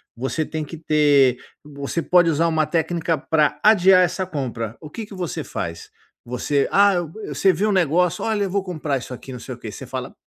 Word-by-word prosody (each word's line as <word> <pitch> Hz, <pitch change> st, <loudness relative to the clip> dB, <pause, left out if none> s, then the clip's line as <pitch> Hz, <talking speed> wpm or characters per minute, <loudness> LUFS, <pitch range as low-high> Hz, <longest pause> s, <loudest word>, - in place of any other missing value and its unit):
você 135 Hz, +6 st, -2 dB
tem 160 Hz, 0 st, -4 dB
que 155 Hz, +3 st, -8 dB
ter 145 Hz, -5 st, +3 dB, 0.3 s
você 145 Hz, +2 st, -4 dB
pode 175 Hz, 0 st, +4 dB
usar 165 Hz, +2 st, +2 dB
uma 160 Hz, -1 st, +1 dB
técnica 165 Hz, +1 st, -1 dB
para 150 Hz, +1 st, +1 dB
adiar 190 Hz, -3 st, +6 dB
essa 180 Hz, +2 st, -1 dB
compra. 120 Hz, -, -4 dB
O 150 Hz, -, -10 dB
que 220 Hz, +7 st, -7 dB
que 205 Hz, -, -13 dB
você 180 Hz, -3 st, -4 dB
faz? 85 Hz, 0 st, -6 dB, 0.3 s
Você, 130 Hz, +4 st, -1 dB
ah, 200 Hz, -1 st, +5 dB, 0.3 s
você 195 Hz, -, +2 dB
vê 195 Hz, +3 st, -1 dB
um -, -, +1 dB
negócio, 175 Hz, 0 st, +2 dB
"olha 215 Hz, -2 st, 0 dB
eu 195 Hz, -, -2 dB
vou 200 Hz, 0 st, 0 dB
comprar 155 Hz, -6 st, -2 dB
isso 125 Hz, -, -8 dB
aqui, 130 Hz, +1 st, -9 dB
não 125 Hz, -, -7 dB
sei -, -, -7 dB
o -, -, -18 dB
quê", -, -, -8 dB
você -, -, -9 dB
fala: -, -, -6 dB
160 Hz, 210 wpm, -22 LUFS, 140-180 Hz, 0.3 s, adiar